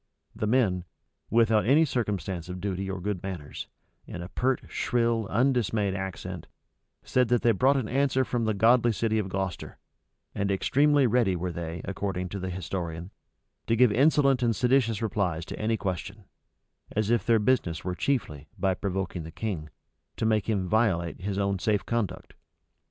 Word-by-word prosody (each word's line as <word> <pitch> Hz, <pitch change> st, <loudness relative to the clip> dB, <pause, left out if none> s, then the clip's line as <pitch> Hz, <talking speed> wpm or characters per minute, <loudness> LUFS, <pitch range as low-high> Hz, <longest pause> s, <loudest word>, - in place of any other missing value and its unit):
The 110 Hz, -, -2 dB
men, 105 Hz, -7 st, +2 dB, 0.4 s
without 110 Hz, -2 st, +3 dB
any 150 Hz, +5 st, +5 dB
circumstance 95 Hz, -, -2 dB
of 90 Hz, 0 st, -5 dB
duty 95 Hz, 0 st, -3 dB
or 95 Hz, -1 st, -3 dB
good 95 Hz, 0 st, -3 dB
manners, 90 Hz, -7 st, -6 dB, 0.4 s
in 90 Hz, -, -6 dB
a 90 Hz, -, -8 dB
pert, 130 Hz, +4 st, 0 dB
shrill, 115 Hz, -3 st, 0 dB
undismayed 115 Hz, -6 st, +1 dB
accent, 95 Hz, -2 st, -5 dB, 0.6 s
said 125 Hz, -1 st, +2 dB
that 120 Hz, 0 st, +1 dB
they 120 Hz, -, +5 dB
brought 130 Hz, +7 st, +3 dB
an 125 Hz, -5 st, -1 dB
answer 130 Hz, 0 st, +1 dB
from 120 Hz, -2 st, -1 dB
the 110 Hz, -1 st, 0 dB
godly 120 Hz, +3 st, +4 dB
city 110 Hz, +1 st, 0 dB
of 100 Hz, -2 st, -3 dB
Gloucester; 95 Hz, -1 st, -4 dB, 0.6 s
and 100 Hz, 0 st, -1 dB
extremely 140 Hz, +8 st, +3 dB
ready 115 Hz, -5 st, +2 dB
were 90 Hz, +1 st, -3 dB
they, 85 Hz, 0 st, -5 dB
according 95 Hz, -2 st, -3 dB
to 100 Hz, -, -5 dB
the 95 Hz, 0 st, -4 dB
historian, 90 Hz, -1 st, -5 dB, 0.6 s
to 115 Hz, -, +3 dB
give 125 Hz, -1 st, +5 dB
insolent 135 Hz, +1 st, +4 dB
and 115 Hz, -2 st, +2 dB
seditious 120 Hz, -3 st, +2 dB
replies 90 Hz, -6 st, -1 dB
to -, -, -7 dB
any 110 Hz, +1 st, 0 dB
question; 100 Hz, +2 st, -4 dB, 0.7 s
as 110 Hz, +1 st, +1 dB
if 120 Hz, -, +2 dB
their 115 Hz, -1 st, +4 dB
business 105 Hz, -9 st, +1 dB
were 90 Hz, -, -2 dB
chiefly, 75 Hz, -, -2 dB
by 95 Hz, 0 st, +1 dB
provoking 95 Hz, -2 st, -3 dB
the 80 Hz, -, -8 dB
king, 80 Hz, -4 st, -4 dB, 0.5 s
to -, -, -2 dB
make 110 Hz, -1 st, +1 dB
him 100 Hz, -4 st, 0 dB
violate 90 Hz, -5 st, +1 dB
his 100 Hz, +1 st, -3 dB
own 100 Hz, -1 st, 0 dB
safe 105 Hz, 0 st, 0 dB
conduct. 105 Hz, -6 st, -3 dB
105 Hz, 170 wpm, -27 LUFS, 90-120 Hz, 0.7 s, any